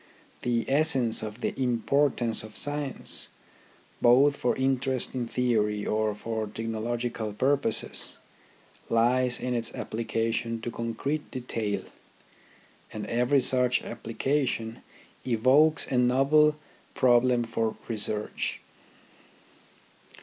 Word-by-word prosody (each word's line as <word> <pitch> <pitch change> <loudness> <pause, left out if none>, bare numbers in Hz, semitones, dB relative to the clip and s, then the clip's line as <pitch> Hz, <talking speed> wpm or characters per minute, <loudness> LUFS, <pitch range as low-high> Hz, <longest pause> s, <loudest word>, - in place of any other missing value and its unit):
The 120 -2 0
essence 135 -6 +3
of 110 +1 -7
the - - -1
importance 125 -1 +1
of 110 0 -10
science, 145 -2 -1 0.7
both 135 +4 +5
for 125 -3 0
interest 130 -1 0
in 125 -2 -3
theory 105 -4 0
or 110 -1 0
for 110 0 -4
technological 115 0 -3
purposes, 130 0 0 0.7
lies 120 +2 +2
in 125 - -2
its 120 -1 -2
application 115 0 -2
to 120 - -4
concrete 115 +7 -3
detail, 115 -5 -3 1.1
and 110 - -5
every 125 +4 +2
such 125 -1 +4
application 115 0 -2 0.4
evokes 130 +6 +4
a 125 - +2
novel 135 +5 +4 0.4
problem 125 -1 +3
for 115 -1 -2
research. 105 -1 -2
120 Hz, 100 wpm, -27 LUFS, 115-130 Hz, 1.1 s, both